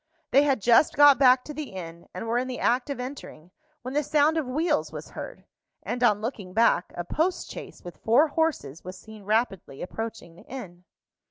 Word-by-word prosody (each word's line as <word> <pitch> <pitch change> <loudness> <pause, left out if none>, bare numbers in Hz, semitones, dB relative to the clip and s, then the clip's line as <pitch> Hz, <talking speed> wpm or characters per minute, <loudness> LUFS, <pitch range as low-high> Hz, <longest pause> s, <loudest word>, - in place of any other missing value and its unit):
They 275 - +6
had 275 -7 +1
just 240 +5 +5
got 285 -2 +7
back 255 -2 +6
to 300 - -8
the 295 -6 -6
inn, 170 -2 -8
and 185 - -6
were 235 +2 +1
in 255 - -2
the 255 -1 -5
act 245 +3 +1
of 280 - -4
entering, 250 - -8 0.3
when 255 +2 -5
the 295 - +2
sound 300 +1 +2
of 315 -5 -1
wheels 300 +4 0
was - - -8
heard; - - -8 0.4
and 245 - -3
on 210 -3 +3
looking 215 -6 -5
back, 225 -5 +3
a 175 - -2
post 330 - -1
chaise - - -10
with 175 - -9
four 265 +8 +3
horses 285 - -1
was 185 +1 -8
seen 220 +2 -13
rapidly 210 - -1
approaching 225 -3 -6
the 175 - -17
inn. 180 -9 -9
245 Hz, 200 wpm, -26 LUFS, 190-285 Hz, 0.4 s, got